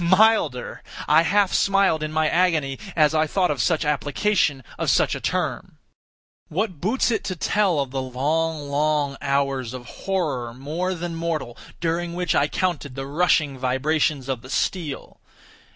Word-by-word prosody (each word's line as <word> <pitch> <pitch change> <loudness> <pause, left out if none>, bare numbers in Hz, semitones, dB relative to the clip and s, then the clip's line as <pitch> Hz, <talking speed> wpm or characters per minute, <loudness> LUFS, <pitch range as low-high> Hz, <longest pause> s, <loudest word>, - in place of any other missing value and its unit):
Milder! 185 - +3 0.3
I 155 +2 +6
half 195 +3 +2
smiled 195 -5 +3
in 155 0 -3
my 155 0 +2
agony 155 -6 +1 0.2
as 155 -1 +4
I 155 0 +2
thought 180 +1 +1
of 140 -4 -1
such 160 +4 +1
application 150 0 +1 0.2
of - - 0
such - - +3
a - - -4
term. - - -2 0.7
What 185 -2 -2
boots 235 +6 +1
it 225 - -1
to 185 - -2
tell 190 -2 +1
of 135 -2 -2
the 135 0 -2
long, 150 +4 -1
long 145 -1 +1
hours 135 -3 -1
of 125 -1 -8
horror 135 -6 -3
more 165 +8 -3
than 175 0 -4
mortal, 165 -7 -3 0.2
during 170 +1 -1
which 180 -2 0
I 145 - +3
counted 150 -6 -2
the 135 0 -4
rushing 145 -2 +1
vibrations 135 +2 0
of 130 -4 -2
the 130 - -12
steel! 155 -2 -3
155 Hz, 160 wpm, -23 LUFS, 140-175 Hz, 0.7 s, I